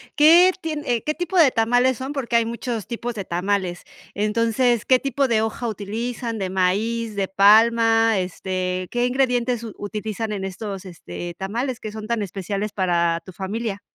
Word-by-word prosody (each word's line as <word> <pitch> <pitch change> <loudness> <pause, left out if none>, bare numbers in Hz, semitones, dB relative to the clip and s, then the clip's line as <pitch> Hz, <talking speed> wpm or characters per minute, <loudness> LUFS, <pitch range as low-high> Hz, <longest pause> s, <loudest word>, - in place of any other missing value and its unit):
¿qué 335 +5 +7
tie 295 -8 -2
qué 305 - 0
tipo 355 +3 -3
de 295 -6 +6
tamales 245 +2 +2
son?, 265 +3 -5
porque 255 -4 -2
hay 230 -1 +4
muchos 235 -2 -4
tipos 235 0 -4
de 200 - -4
tamales, 180 0 -1 0.3
entonces, 230 +3 +1
¿qué 255 -1 +4
tipo 275 0 0
de 225 -3 +2
hoja 225 +2 -2
utilizan?, 225 +3 -4
¿de 190 -2 -2
maíz, 210 +4 0
de 195 -1 -1
palma?, 225 +2 +5
este, 185 0 -3
¿qué 245 0 +1
ingredientes 245 -2 0
utilizan 215 +1 -4
en 195 -2 -4
estos, 195 0 -6
este, 175 - -8
tamales 235 +6 -3
que 215 - -6
son 215 0 -7
tan 235 -2 -1
especiales 200 +2 -4
para 170 -3 +1
tu 185 - -10
familia? 200 +2 -4
225 Hz, 165 wpm, -22 LUFS, 195-240 Hz, 0.3 s, qué